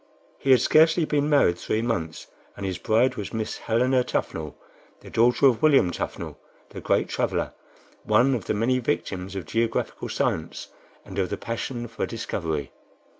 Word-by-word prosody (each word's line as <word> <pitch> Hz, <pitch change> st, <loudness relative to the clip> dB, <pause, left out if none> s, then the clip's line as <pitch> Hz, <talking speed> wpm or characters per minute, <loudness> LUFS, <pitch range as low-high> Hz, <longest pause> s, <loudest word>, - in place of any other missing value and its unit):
He 135 Hz, -, -3 dB
had 130 Hz, -2 st, +7 dB
scarcely 160 Hz, +1 st, +4 dB
been 145 Hz, -1 st, 0 dB
married 135 Hz, -, +3 dB
three 110 Hz, +1 st, -1 dB
months, 85 Hz, -9 st, -3 dB, 0.3 s
and 100 Hz, -, -5 dB
his 95 Hz, -3 st, -3 dB
bride 120 Hz, +7 st, +2 dB
was 100 Hz, -, -5 dB
Miss 110 Hz, -1 st, -3 dB
Helena 125 Hz, +3 st, +2 dB
Tuffnell, 80 Hz, -, -3 dB, 0.5 s
the -, -, -12 dB
daughter 120 Hz, +4 st, +3 dB
of 125 Hz, -4 st, +4 dB
William 140 Hz, -, +5 dB
Tuffnell, -, -, -5 dB, 0.3 s
the -, -, -8 dB
great -, -, +1 dB
traveler, -, -, -1 dB, 0.5 s
one 135 Hz, +3 st, +3 dB
of 115 Hz, -7 st, -2 dB
the -, -, -1 dB
many 125 Hz, +4 st, +1 dB
victims 95 Hz, -7 st, -3 dB
of 95 Hz, -, -4 dB
geographical 115 Hz, 0 st, -2 dB
science -, -, -2 dB, 0.4 s
and 95 Hz, 0 st, -6 dB
of 95 Hz, -, 0 dB
the -, -, -3 dB
passion 120 Hz, +1 st, -4 dB
for 115 Hz, 0 st, -4 dB
discovery. 80 Hz, -, -3 dB
115 Hz, 165 wpm, -25 LUFS, 95-130 Hz, 0.5 s, had